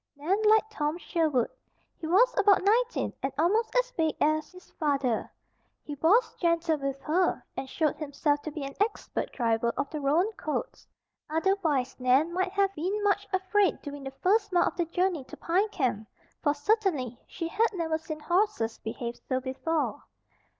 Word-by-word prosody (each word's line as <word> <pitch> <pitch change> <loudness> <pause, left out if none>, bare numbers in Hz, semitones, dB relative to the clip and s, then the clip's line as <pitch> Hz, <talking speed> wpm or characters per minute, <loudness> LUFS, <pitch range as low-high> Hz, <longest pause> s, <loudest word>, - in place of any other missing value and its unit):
Nan 350 +9 0
liked 435 0 +4
tom 300 -4 -1
Sherwood. 310 -9 0 0.5
He 320 - -5
was 470 +9 +4
about 405 -2 +4
nineteen 470 +4 +2
and 270 - -1
almost 420 +9 +2
as - - +2
big 320 -6 0
as 310 0 +1
his 365 0 -16
father. 275 -7 0 0.5
He 295 - -6
was 340 - +3
gentle 335 -2 +2
with 275 -1 -3
her, 355 +5 +1
and 265 - -5
showed 310 0 0
himself 290 -1 0
to 310 - -5
be 295 -1 -5
an 275 0 -5
expert 420 +1 -1
driver 235 -1 +1
of 280 - -2
the 305 -2 -4
roan 325 +10 +2
colts. 420 +4 -5 0.4
Otherwise 320 -6 0
Nan 265 +7 +3
might 370 +1 -1
have 395 -1 +2
been 390 +6 -2
much 410 0 +1
afraid 380 +1 +2
during 285 -1 -7
the 270 - -4
first 410 +2 +3
mile 350 -1 +4
of - - -15
the 345 - 0
journey 355 -2 0
to - - -11
Pine 380 +6 +1
Camp, 245 - -1 0.3
for 290 -2 +2
certainly 300 - 0
she 330 - -4
had 445 +7 +1
never 325 -3 -1
seen 310 -1 -7
horses 345 - 0
behave 235 +2 -5
so 260 -1 +1
before. 275 +5 -2
325 Hz, 170 wpm, -28 LUFS, 285-390 Hz, 0.5 s, liked